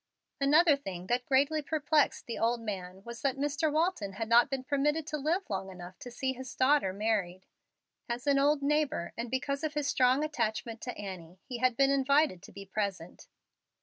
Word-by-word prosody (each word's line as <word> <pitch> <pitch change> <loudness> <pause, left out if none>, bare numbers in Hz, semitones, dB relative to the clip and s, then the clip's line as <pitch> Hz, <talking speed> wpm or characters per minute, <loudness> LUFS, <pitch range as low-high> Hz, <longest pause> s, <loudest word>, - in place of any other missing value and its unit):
Another 300 +3 +5
thing 190 -10 -7
that 245 +5 -1
greatly 285 +3 +3
perplexed 300 0 +1
the 235 - -5
old 235 +1 +1
man 190 -4 -6
was 235 +1 -8
that 275 -1 0
Mr. 290 +2 0
Walton 310 - 0
had 220 +3 -4
not 235 +2 +5
been 270 -2 -3
permitted 295 +3 0
to 300 - -3
live 335 +7 0
long 195 -1 -3
enough 180 0 -10
to 245 - -8
see 260 +2 -2
his 260 0 -9
daughter 260 -6 +3
married. 195 -3 -1 0.6
As 240 +2 -3
an 280 -1 +3
old 285 +1 +2
neighbor, 295 - 0
and 235 +1 -4
because 275 +3 -2
of 305 -1 -2
his 295 -1 -1
strong 260 +1 +3
attachment 230 -6 -2
to 245 - -6
Annie, 185 -3 -8
he 245 -2 -6
had 255 -1 +2
been 275 0 +4
invited 275 - +2
to 195 - -13
be 200 - -10
present. 195 -4 -4
255 Hz, 190 wpm, -30 LUFS, 205-285 Hz, 0.6 s, Another